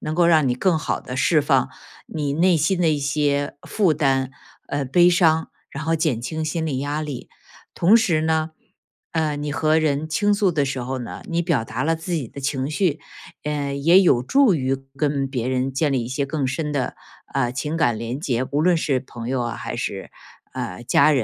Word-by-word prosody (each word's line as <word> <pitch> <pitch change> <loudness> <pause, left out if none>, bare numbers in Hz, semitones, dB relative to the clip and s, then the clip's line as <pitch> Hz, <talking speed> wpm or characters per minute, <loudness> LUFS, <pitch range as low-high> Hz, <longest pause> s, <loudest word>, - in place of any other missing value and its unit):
能 155 - -3
够 175 +1 +4
让 160 -4 +4
你 125 - +1
更 165 +6 +1
好 150 - -2
地 125 - -7
释 155 +4 +3
放 145 - +2 0.4
你 145 -3 -3
内 170 +3 +3
心 165 +5 +1
的 170 - +3
一 150 -2 +1
些 145 0 0
负 190 -7 +2
担， 135 -3 +1 0.4
呃， 145 -1 -1
悲 175 +7 +5
伤， 160 -3 +3 0.2
然 140 - -6
后 165 0 +1
减 155 -8 0
轻 155 +6 -4
心 160 +1 -2
理 140 -4 -2
压 145 +2 -2
力。 145 -5 -6 0.5
同 195 +7 +5
时 175 -9 +2
呢， 160 0 0 0.6
呃， 155 -2 0
你 145 0 -3
和 155 +1 +2
人 155 -1 0
倾 205 +6 +1
诉 200 -2 +2
的 150 -3 +1
时 135 -1 -3
候 130 +2 -3
呢， 120 - -7
你 170 0 0
表 165 -9 0
达 115 +3 -4
了 165 +2 +1
自 165 +3 -6
己 150 -8 -2
的 140 - -9
情 135 0 -2
绪， 160 -2 0 0.4
呃， 145 -2 -2
也 165 +7 +5
有 150 -10 +4
助 265 - +4
于 135 -3 0 0.2
跟 140 -2 0
别 125 -3 -2
人 130 +1 -1
建 145 +3 +1
立 125 -3 0
一 - - -6
些 140 +2 -2
更 140 -1 -2
深 150 +4 -2
的， 140 -3 -2 0.4
呃， 130 -3 +1
情 150 +4 -3
感 120 -9 +1
联 115 +3 -4
结， 130 -6 -1
无 145 - +1
论 175 +1 +4
是 145 -5 0
朋 120 -2 -8
友 130 -1 0
啊， 120 -2 -3
还 - - -5
是， - - -4 0.4
呃， 90 +5 -5
家 - - +4
人。 - - +6
150 Hz, 230 characters per minute, -22 LUFS, 135-160 Hz, 0.6 s, 人